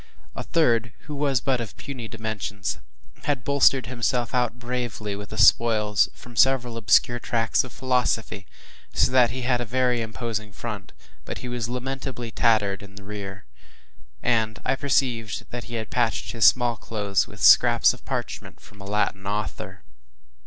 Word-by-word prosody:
A - - -4
third, 120 -7 +1
who 150 - -8
was 140 -3 +1
but 130 -3 0
of 110 -3 -8
puny 130 -5 -7
dimensions, 105 -5 -4 0.5
had 140 -4 -1
bolstered 140 -3 +3
himself 120 0 -1
out 125 -2 0
bravely 120 -4 -4
with 100 0 -8
the 110 - -8
spoils 105 0 +4
from 120 0 -14
several 125 -1 +3
obscure 115 +3 +3
tracts 115 -1 +1
of 130 - -10
philosophy, 125 -6 -1 0.5
so - - +3
that 125 -2 +5
he 125 +2 -5
had 125 -1 +1
a - - 0
very 125 0 +1
imposing 110 -2 -4
front, 105 -4 -6 0.3
but - - -6
he - - -4
was 120 -2 -3
lamentably 125 -1 -4
tattered 105 -4 +2
in 100 0 -13
rear, 100 0 -8 0.8
and 110 -3 +1
I - - +2
perceived 125 -5 -1
that 120 -2 -5
he 120 +1 -7
had 110 -1 -5
patched 120 -2 0
his 115 -3 +2
small 120 -2 +4
clothes 100 -4 -1
with - - -13
scraps - - +6
of - - -14
parchment - - -5
from 100 -1 -16
a - - -9
Latin 100 -1 -1
author. 100 -10 -4
115 Hz, 160 wpm, -24 LUFS, 105-125 Hz, 0.8 s, scraps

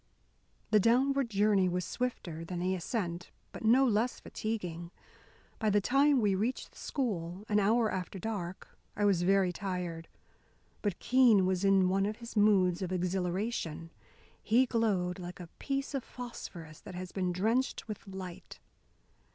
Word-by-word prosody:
The 215 - +6
downward 260 +4 +3
journey 200 -2 +3
was 180 0 -1
swifter 180 -10 -4
than 175 +1 -5
the 180 +2 0
ascent, 175 -2 -3 0.2
but - - -9
no 245 +5 +5
less 235 +1 +1
fatiguing. 175 -6 -4 0.7
By 220 - +1
the 205 0 +4
time 275 +6 +3
we 205 -4 +2
reached 220 +7 -2
the - - -20
school, 195 - -3
an 210 -1 +3
hour 220 +2 +3
after 185 +1 -4
dark, 185 -3 -5 0.2
I 205 - +1
was 195 -4 +3
very 190 0 +3
tired. 180 -4 -4 0.7
But 205 -4 -1
Keene 245 -7 +5
was 185 0 0
in 195 -1 +4
one 195 +2 +2
of 215 +1 -4
his 235 0 -10
moods 195 -4 +4
of 185 -1 -3
exhilaration. 180 -2 -2 0.5
He 240 +4 +4
glowed 200 -7 0
like 175 -1 -8
a 175 -2 -9
piece 275 +1 -2
of 270 -3 -2
phosphorus 175 -10 -9
that 195 -4 -9
has 185 0 -6
been 185 -2 -1
drenched 225 +10 0
with 215 -2 -7
light. 190 -2 -8
195 Hz, 155 wpm, -31 LUFS, 180-225 Hz, 0.7 s, The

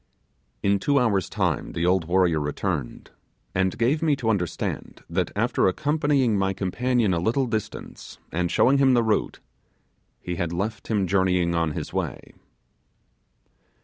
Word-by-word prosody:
In 100 0 +2
two 140 +8 +1
hours' 105 - +1
time - - -1
the 85 - -1
old 90 -2 +2
warrior 85 -2 +2
returned, 75 -1 -3 0.4
and 95 0 0
gave 130 +7 +1
me 155 -3 +3
to 120 -5 0
understand 90 -5 -3
that 85 0 -1
after 115 +2 +2
accompanying 145 +1 +1
my 95 0 +1
companion 115 +2 0
a 85 - 0
little 120 +9 +1
distance, 110 -3 -5
and 90 +1 -1
showing 135 +9 +3
him 135 -2 +5
the 120 - +3
route, 110 -2 0 0.8
he 90 -1 -5
had 85 -1 -2
left 105 +5 -3
him 105 -4 +1
journeying 90 -2 +2
on 85 -2 0
his - - -6
way. - - -4
100 Hz, 145 wpm, -24 LUFS, 90-120 Hz, 0.8 s, him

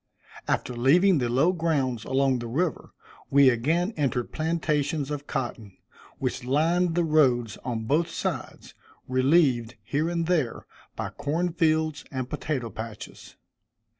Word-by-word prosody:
After 125 - -1
leaving 160 +9 +4
the 120 -2 0
low 135 +9 +3
grounds 140 -9 -1
along 135 -1 +1
the 120 - -5
river, 155 +7 -2 0.4
we 140 -1 +6
again 165 - 0
entered 125 -5 -1
plantations 155 -2 -1
of 145 -1 -5
cotton, 110 -6 -4 0.4
which - - -3
lined 165 +6 +1
the 175 - +2
roads 130 -9 +2
on 120 -3 -3
both 155 +8 +1
sides, - - -5 0.3
relieved, 130 -3 +2
here 155 +4 -1
and 170 -1 -1
there, 160 -9 0 0.3
by - - -4
corn 165 +4 -2
fields 160 -2 +1
and 130 -2 -3
potato 130 -4 -3
patches. 110 -1 -9
145 Hz, 135 wpm, -26 LUFS, 125-165 Hz, 0.4 s, we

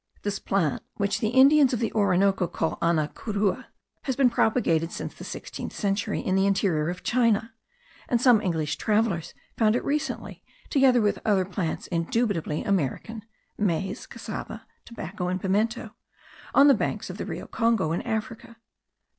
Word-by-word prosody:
This 205 -1 -2
plant, 175 -7 0
which 200 0 0
the 220 - 0
Indians 265 +3 +5
of 240 - 0
the 230 - -1
Orinoco 195 -3 +2
call 160 - -2
ana 165 -3 +2
curua, 210 - -2 0.4
has 265 - -1
been 255 -2 +4
propagated 175 -9 +1
since - - -6
the - - -11
sixteenth - - -7
century 205 +1 -1
in 185 - -1
the 195 +1 +3
interior 175 -6 +1
of 180 - -6
China,* 230 -2 +1 0.6
and 240 - +2
some 245 -3 +5
English 155 -5 -1
travellers 210 -5 0 0.2
found 220 -1 +4
it - - -2
recently, 295 +1 -3 0.3
together 265 -3 +4
with 205 -1 +1
other 200 -4 +2
plants 180 -3 -3
indubitably 170 -2 -1
American 200 - -1 0.4
(maize, 195 -2 -1
cassava, - - -7 0.2
tobacco, 190 -5 -5
and 185 +1 -1
pimento), 205 +5 -1 0.6
on 280 - +7
the 280 - +8
banks 225 - -2
of - - -10
the - - -3
River - - -5
Congo, 225 -8 +1
in 170 - -1
Africa. 230 0 -4
205 Hz, 155 wpm, -26 LUFS, 180-230 Hz, 0.6 s, the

